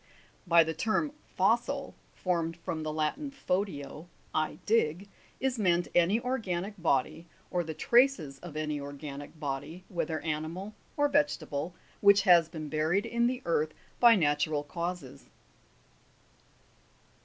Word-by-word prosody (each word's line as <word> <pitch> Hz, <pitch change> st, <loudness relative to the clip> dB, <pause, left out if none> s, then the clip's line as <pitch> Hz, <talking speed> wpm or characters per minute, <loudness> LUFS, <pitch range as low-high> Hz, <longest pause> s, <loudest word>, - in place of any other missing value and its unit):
By 170 Hz, -1 st, +7 dB
the 160 Hz, 0 st, -3 dB
term 225 Hz, -, 0 dB, 0.3 s
fossil 240 Hz, +8 st, +1 dB, 0.2 s
(formed 170 Hz, -2 st, -1 dB
from 165 Hz, -1 st, -4 dB
the 155 Hz, 0 st, -3 dB
Latin, 155 Hz, -, -1 dB
fodio, 180 Hz, -, -3 dB, 0.3 s
I 155 Hz, 0 st, 0 dB
dig) 195 Hz, -4 st, +1 dB, 0.3 s
is 255 Hz, -2 st, -1 dB
meant 175 Hz, -3 st, +2 dB
any 175 Hz, +6 st, +4 dB
organic 215 Hz, -6 st, -2 dB
body, 160 Hz, +1 st, 0 dB, 0.2 s
or 180 Hz, -1 st, +1 dB
the 160 Hz, -1 st, -6 dB
traces 235 Hz, -, +3 dB
of 170 Hz, -4 st, -8 dB
any 150 Hz, -1 st, -2 dB
organic 145 Hz, +1 st, -8 dB
body, 145 Hz, +4 st, -4 dB
whether 165 Hz, -3 st, -2 dB
animal 160 Hz, +6 st, -4 dB, 0.2 s
or 290 Hz, 0 st, +4 dB
vegetable, 175 Hz, -, 0 dB, 0.2 s
which 200 Hz, -1 st, +6 dB
has 175 Hz, -4 st, +6 dB
been 155 Hz, -2 st, -6 dB
buried 155 Hz, +6 st, +1 dB
in 235 Hz, 0 st, +1 dB
the 255 Hz, +1 st, -3 dB
earth 155 Hz, -2 st, 0 dB, 0.2 s
by 235 Hz, -1 st, +8 dB
natural 150 Hz, -3 st, +1 dB
causes. 170 Hz, -3 st, -5 dB
170 Hz, 130 wpm, -30 LUFS, 155-205 Hz, 0.3 s, by